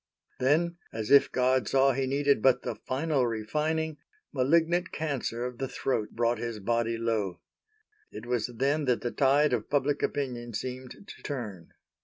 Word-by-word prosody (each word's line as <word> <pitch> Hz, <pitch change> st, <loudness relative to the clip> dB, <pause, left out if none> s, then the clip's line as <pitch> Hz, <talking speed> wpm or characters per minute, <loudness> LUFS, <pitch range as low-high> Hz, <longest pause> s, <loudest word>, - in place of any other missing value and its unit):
Then, 165 Hz, +6 st, +2 dB
as 110 Hz, -1 st, -4 dB
if 140 Hz, -, +6 dB
God 130 Hz, -3 st, +2 dB
saw 135 Hz, +3 st, +4 dB
he 135 Hz, +1 st, -1 dB
needed 140 Hz, -2 st, +2 dB
but 125 Hz, 0 st, +4 dB
the 120 Hz, -, -2 dB
final 130 Hz, +4 st, -1 dB
refining, 150 Hz, +8 st, -1 dB, 0.4 s
malignant 165 Hz, +6 st, +2 dB
cancer 135 Hz, -6 st, -2 dB
of 125 Hz, -1 st, -6 dB
the 135 Hz, -, -1 dB
throat 125 Hz, -4 st, -2 dB
brought 120 Hz, 0 st, +1 dB
his 115 Hz, -2 st, -4 dB
body 115 Hz, +2 st, 0 dB
low. 110 Hz, -5 st, -1 dB, 0.7 s
It -, -, -8 dB
was 120 Hz, -2 st, 0 dB
then 140 Hz, +5 st, 0 dB
that 125 Hz, -2 st, +1 dB
the 120 Hz, -, -2 dB
tide 140 Hz, +1 st, +3 dB
of 115 Hz, -3 st, -2 dB
Public 145 Hz, 0 st, +1 dB
Opinion 120 Hz, -5 st, -3 dB
seemed 130 Hz, -, -6 dB
to -, -, -11 dB
turn. 105 Hz, -, -6 dB
130 Hz, 160 wpm, -28 LUFS, 115-145 Hz, 0.7 s, if